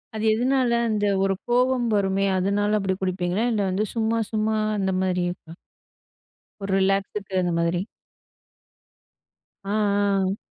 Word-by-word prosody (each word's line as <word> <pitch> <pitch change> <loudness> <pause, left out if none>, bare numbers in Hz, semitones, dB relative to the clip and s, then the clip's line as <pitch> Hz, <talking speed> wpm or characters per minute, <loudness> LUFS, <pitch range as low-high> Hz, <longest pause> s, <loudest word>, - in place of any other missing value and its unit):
அது 215 - -3
எதனால? 250 +2 +1 0.2
அந்த 210 -1 0 0.2
ஒரு 195 0 +2 0.2
கோவம் 250 0 +2
வருமே, 195 -1 +1
அதனால 205 +3 +1
அப்படி 195 -1 0
குடிப்பீங்களா? 185 +2 -1
இல்லை 210 -3 0
வந்து 195 +3 0
சும்மா 225 0 +1
சும்மா 220 0 0 0.2
அந்த 190 -1 0
மாரியிருக்கா? 180 -2 -2 1.1
ஒரு 195 0 -3
ரிலாக்ஸுக்கு 195 +1 -1
அது 175 - 0
மாரி. 170 +1 0 1.8
ஆ, - - -8
ஆ. 200 -2 +1
200 Hz, 120 wpm, -24 LUFS, 190-215 Hz, 1.8 s, ஒரு